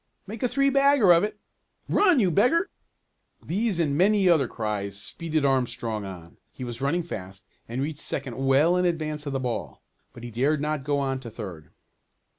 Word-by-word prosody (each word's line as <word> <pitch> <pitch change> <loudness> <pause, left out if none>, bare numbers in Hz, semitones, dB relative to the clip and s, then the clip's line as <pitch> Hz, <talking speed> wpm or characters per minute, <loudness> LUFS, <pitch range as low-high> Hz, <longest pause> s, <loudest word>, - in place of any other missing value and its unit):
"Make 215 +2 -8
a 250 - +2
three 275 +2 +2
bagger 275 -8 +5
of 170 - +4
it!" 210 0 -3 0.5
"Run, 365 -8 +4
you 190 -6 +3
beggar!" 265 - +2 0.7
These 205 +2 0
and 150 -4 +1
many 195 +3 +3
other 160 -7 +4
cries 100 -4 -4
speeded 155 +6 -2
Armstrong 120 -5 -1
on. 90 -3 -10
He 130 - -8
was 120 0 -6
running 165 +6 0
fast 95 - -8 0.2
and 125 +3 -2
reached 150 0 -4
second 130 -4 -4
well 140 +6 +4
in 180 - +2
advance 155 -3 -2
of 140 - -3
the 135 - -1
ball. 125 -2 -4 0.3
But 120 - -12
he 120 - -7
dared 140 +7 +1
not 150 -1 -2
go 145 +1 0
on 135 -1 -1
to 120 -3 -9
third. 95 -9 -8
145 Hz, 185 wpm, -26 LUFS, 120-180 Hz, 0.7 s, bagger